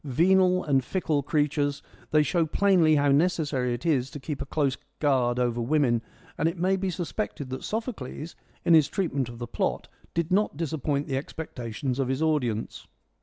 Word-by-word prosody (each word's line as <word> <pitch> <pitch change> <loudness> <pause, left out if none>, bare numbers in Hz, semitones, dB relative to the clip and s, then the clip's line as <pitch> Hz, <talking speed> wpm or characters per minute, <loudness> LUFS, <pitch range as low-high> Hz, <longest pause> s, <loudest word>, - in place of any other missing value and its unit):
Venal 185 +6 +3
and 135 -3 +2
fickle 155 0 0
creatures, 145 0 0 0.3
they 150 0 +4
show 165 +3 +1
plainly 175 -3 +4
how 145 -1 +3
necessary 145 -5 +1
it 120 - -9
is 135 -6 +2
to 145 - -8
keep 140 +1 -5
a 140 - -5
close 140 -3 0 0.2
guard 130 -5 +2
over 120 -1 0
women, 120 -2 +2 0.4
and 160 - +3
it 170 - -7
may 185 +3 +2
be 190 0 -1
sus 175 -1 -4
pected 145 -10 -3
that 130 - -5
Sophocles, 205 - -5 0.3
in 170 - +5
his 155 -4 +6
treatment 140 -10 -1
of 120 - -9
the 120 - -4
plot, 115 - -2 0.3
did 170 +1 -1
not 200 -5 +2
disappoint 150 -3 -1
the 135 -3 -1
expectations 130 -3 -4
of 135 - +1
his 130 +4 -1
audience. 125 -9 -1
145 Hz, 180 wpm, -27 LUFS, 130-165 Hz, 0.4 s, his